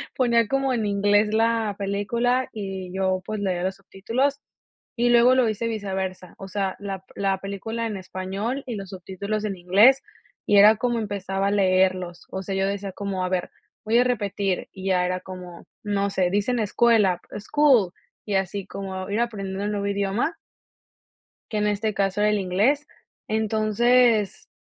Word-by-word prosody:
Ponía 235 -3 +3
como 270 +1 0
en 225 -3 0
inglés 205 +1 +2
la 225 -2 +1
película 235 +6 0
y 190 -3 -6
yo 190 -1 0
pues 215 -1 -4
leía 180 -3 -1
los 190 +1 -1
subtítulos 230 +9 -2 0.6
y 240 0 +2
luego 240 +2 +6
lo 250 -3 +3
hice 220 +2 -2
viceversa, 190 -4 -4
o 195 - -8
sea, 195 -1 -2
la 195 -1 -4
p - - -20
la 195 -1 0
película 200 +4 -4
en 215 -2 -3
español 195 +7 -4
y 245 - -4
los 195 -2 -7
subtítulos 200 +3 -4
en 205 -2 -2
inglés 205 +10 +5 0.4
y 205 - +4
era 210 +2 +8
como 240 +1 0
empezaba 195 -2 -2
a - - +1
leerlos. 185 -3 +1
O 190 - -4
sea, 195 0 -3
yo 195 0 +1
decía 200 0 -3
como: 195 -1 -3
"A - - -1
ver, 180 -1 -2 0.3
voy 225 +2 +3
a 245 - +5
repetir", 200 -6 -1
y 190 -1 -8
ya 180 -1 +2
era 185 0 -2
como, 180 -2 -10 0.2
no 200 -1 0
sé, 185 -2 +1
dicen 205 +6 0
escuela, 215 -4 +3 0.2
school, 245 -3 +3 0.3
y 205 - -3
así 190 +1 -2
como 190 -1 -6
ir 210 +3 0
aprendiendo 200 -4 -3
el 205 - -1
nuevo 200 -1 -2
idioma 200 - -1 1.1
que 215 - -3
en 210 - +1
este 210 +1 0
caso 195 +1 0
era 210 - +4
el 210 - +1
inglés. 205 +11 +1 0.4
Entonces 220 0 +2
200 Hz, 175 wpm, -24 LUFS, 190-225 Hz, 1.1 s, era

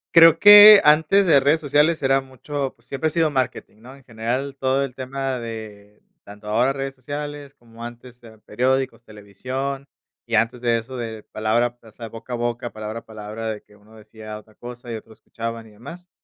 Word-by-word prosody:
Creo 165 -1 +8
que 205 0 +10
antes 160 +6 +4
de 150 -6 +5
redes 145 +4 +2
sociales 150 +2 +1
era 135 0 +3
mucho, 135 +1 -6
pues, 115 - -28
siempre 135 +4 -3
ha - - +1
sido 160 -1 +1
marketing, 130 -5 -3
¿no? 125 +5 -14
En 135 - -19
general, 125 +4 -4
todo 135 +1 +1
el 135 -3 -5
tema 135 0 -4
de 105 -3 -10 0.2
tanto 105 +1 -11
ahora 120 +5 +2
redes 135 0 -5
sociales 145 +2 -7
como 115 0 -13
antes 120 +1 -12
era 110 -2 -15
periódicos, 130 +3 -2
televisión 130 +7 -6 0.4
y - - -1
antes 115 +2 +1
de 120 -1 +1
eso 130 +3 -9
de 110 -3 -6
palabra, 115 +3 -1
o 110 - -17
sea, 115 -2 -9
boca 115 +3 -9
a - - 0
boca, 120 0 -3
palabra 110 +1 -6
a - - -22
palabra 110 +1 -7
de 110 -1 -4
que 105 - -23
uno 105 +2 -21
decía 110 0 -10
otra 110 0 -17
cosa 120 +2 -10
y 115 - -4
otros 110 0 -12
escuchaban 115 0 -7
y 110 - -17
demás. 165 +12 -12
120 Hz, 200 wpm, -22 LUFS, 110-140 Hz, 0.4 s, que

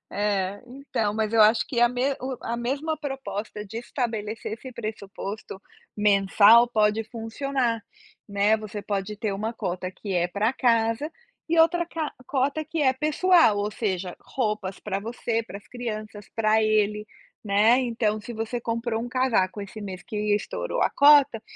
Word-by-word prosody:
É, 200 -1 -1
então, 250 -5 -2
mas 215 +1 -2
eu 225 - +6
acho 220 +2 +5
que 240 - -1
a 240 0 +5
me 250 +3 0
o 260 -1 -4
a 235 - -3
mesma 280 +7 -2
proposta 220 -8 -5
de 225 +3 -7
estabelecer 225 -4 -4
esse 255 +3 -9
pressuposto 210 -3 -6 0.4
mensal 210 +3 +6
pode 215 -1 +2
funcionar, 235 0 -2 0.5
né. 200 +2 +3
Você 215 -1 -7
pode 200 0 -3
ter 210 -2 -2
uma 220 +4 -3
cota 180 -3 -3
que 195 0 -6
é 175 0 +2
para 210 +7 0
casa 230 +3 +1 0.4
e 335 - +2
outra 335 +2 +4
ca 315 -3 -4
cota 285 +3 0
que 325 - -4
é 260 -1 +4
pessoal, 305 - +4
ou 205 +1 -1
seja, 190 -4 -3
roupas 210 -6 -3
para 195 -2 -3
você, 230 +1 -2
para 210 -3 -9
as 205 - -18
crianças, 215 -4 -6
para 220 0 +3
ele, 215 -1 +1 0.4
né. 215 +5 +4
Então, 220 -3 -1
se 240 - -8
você 225 +2 -3
comprou 230 0 -2
um 240 - -5
casaco 220 -7 +1
esse 210 +2 -8
mês 190 -2 -7
que 215 - -8 0.2
estourou - - -3
a - - +1
cota, 285 -6 +6
225 Hz, 165 wpm, -25 LUFS, 205-245 Hz, 0.5 s, eu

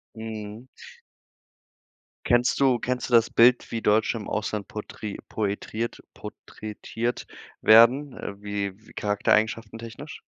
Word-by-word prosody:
Mhm. 110 +1 -7 1.6
Kennst 120 +3 +2
du 130 -3 +4
kennst 125 0 -2
du - - -4
das 115 -1 +5
Bild, 120 +1 +4
wie 115 -1 -2
Deutsche 110 +2 +2
im 105 - -7
Ausland 105 -1 -3
portri 105 -1 -7
poetriert 110 +2 -3
porträtiert 115 +2 -6 0.3
werden, 125 +6 +6
äh, 100 0 -7
wie 100 -1 -3 0.2
w - - -16
Charaktereigenschaften-technisch? 115 +6 -1
110 Hz, 110 wpm, -25 LUFS, 105-120 Hz, 1.6 s, werden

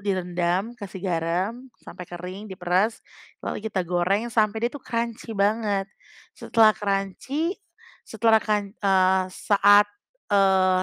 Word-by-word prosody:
direndam, 185 +1 -1
kasih 195 -2 -8
garam, 185 +8 -2 0.2
sampai 180 - -9
kering, 180 +4 -8
diperas, 185 +3 -1 0.4
lalu - - -3
kita 190 -4 -2
goreng 185 +7 0
sampai 220 0 +1
dia 240 - +1
tuh 285 - -8
crunchy 230 -1 -4
banget. 205 -1 +1 0.5
Setelah 220 -2 +4
crunchy 205 - -2 0.6
setelah 220 0 +3
crun 210 -2 -1
eee, 190 -1 +3
saat, 205 +2 +4 0.5
eee, 190 -2 +4
200 Hz, 115 wpm, -24 LUFS, 185-220 Hz, 0.6 s, Setelah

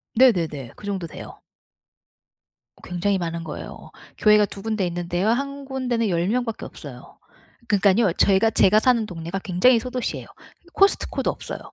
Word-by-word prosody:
네네네. 165 - +2
그 205 - -13
정도 190 -4 -3
돼요. - - -11 1.4
굉장히 185 +3 -1
많은 170 -1 -4
거예요. 155 - -9 0.3
교회가 210 -1 +5
2 200 - -10
군데 215 -3 -1
있는데요 175 +3 -2
1 275 +3 -2
군데는 250 -5 -1
10 170 0 0
명밖에 230 0 -2
없어요. - - -11 0.5
그니깐요 200 -1 +3
저희가 195 +4 +3
제가 210 0 +4
사는 235 -2 +2
동네가 175 0 -5
굉장히 210 +7 +3
소도시예요. 250 0 -4 0.5
코스트코도 395 0 +2
없어요. - - -5
205 Hz, 325 characters per minute, -23 LUFS, 175-235 Hz, 1.4 s, 교회가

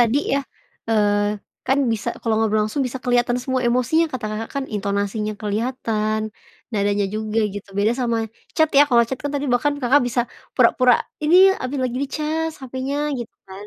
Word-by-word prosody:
tadi 240 +3 +4 0.2
ya, - - +2 0.5
eee, 205 -2 +3 0.5
kan 265 +2 +3
bisa 215 - -4
kalau 225 -2 0
ngobrol 215 -1 +2
langsung, 215 +6 -1
bisa 255 +1 -5
kelihatan 245 0 +2
semua 260 -1 -1
emosinya 255 +7 +2
kata 245 -4 -4
Kakak 220 +1 -4
kan, 275 -1 -1
intonasinya 205 +1 -1
kelihatan, 215 0 -1 0.5
nadanya 205 -1 +1
juga, 215 +1 -2 0.2
gitu. 200 -1 -7
Beda 215 +3 +3
sama 235 -2 +1 0.4
chat 315 -1 +4
ya, - - +9
kalau 235 -2 +5
chat 265 - -4
kan 290 - -2
tadi 285 0 -1
bahkan 290 +4 +2
Kakak 265 +4 +5
bisa 245 0 0 0.3
pura-pura, 255 -1 +5 0.3
"Ini, 325 +4 +5 0.3
habis 260 +2 -3
lagi 250 0 -2
di - - -1
cas 320 +1 -1
HP-nya." 260 +2 -4 0.2
Gitu 235 - -7
kan? 195 +2 -9
240 Hz, 175 wpm, -21 LUFS, 215-265 Hz, 0.5 s, ya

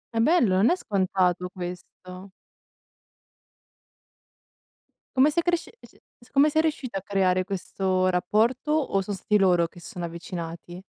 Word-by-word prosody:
È 225 - +1
bello, 245 - +3
non 195 +5 +4
è - - +3
scontato 185 - 0
questo. 180 +1 -9 2.9
Come 265 +3 +5
si 315 +3 0
è - - +3
cresc 345 -1 0
sc - - -18 0.2
s 240 - -20
come 280 +2 +4
sei 315 +1 +2
riuscita 275 -9 -2
a 195 - -6
creare 185 -2 +1
questo 185 -1 -1
rapporto 220 - +1
o 290 -10 +1
son 205 +2 -4
stati 210 +2 +1
loro 180 -4 +3
che 175 - -16
si 170 - -11
sono 180 -6 -5
avvicinati? 170 +1 -7
190 Hz, 150 wpm, -25 LUFS, 180-245 Hz, 2.9 s, Come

